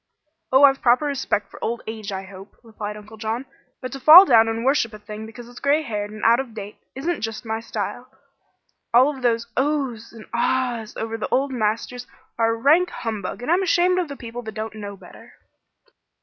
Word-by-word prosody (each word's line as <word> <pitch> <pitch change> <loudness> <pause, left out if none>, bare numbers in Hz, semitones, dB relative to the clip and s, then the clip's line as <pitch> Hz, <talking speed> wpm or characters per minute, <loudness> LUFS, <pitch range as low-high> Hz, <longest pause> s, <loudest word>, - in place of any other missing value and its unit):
"Oh, 265 +2 +5
I've 270 -1 +7
a - - -34
proper 250 +4 +3
respect 275 -7 -1
for - - -11
old 235 +1 -2
age, 220 -2 -6
I 190 0 -4
hope," 195 +1 -13
replied 210 -2 -7
Uncle 215 +1 -13
John; 225 +4 -3 0.4
"but 255 - -5
to 275 - -6
fall 320 +8 +10
down 225 -7 +5
and 225 +1 -2
worship 260 -5 +1
a - - -8
thing 215 +1 -9
because 235 +1 -11
it's 245 0 -12
gray 290 +3 +2
haired 210 -5 -4
and 215 0 -10
out 230 +2 +5
of 250 -4 -6
date 205 -1 -8 0.2
isn't 330 +6 -2
just 225 +1 -5
my 220 0 -2
style. 225 - -5 0.9
All 265 +4 +5
of 265 - -11
these 235 -1 +1
'Oh!'s' 265 -5 -1
and 225 -2 -12
'Ahs!' 235 -2 -1
over 225 0 -3
the - - -3
old 275 +1 +1
masters 240 +1 -2 0.3
are 225 0 +2
rank 305 +10 +3
humbug, 220 - -5
and 300 - -1
I'm 360 +3 +3
ashamed 365 0 +2
of 355 - -1
the 280 -1 -8
people 235 0 -7
that 220 -3 -8
don't 215 0 -5
know 205 -2 -8
better." - - -15
230 Hz, 205 wpm, -22 LUFS, 220-270 Hz, 0.9 s, fall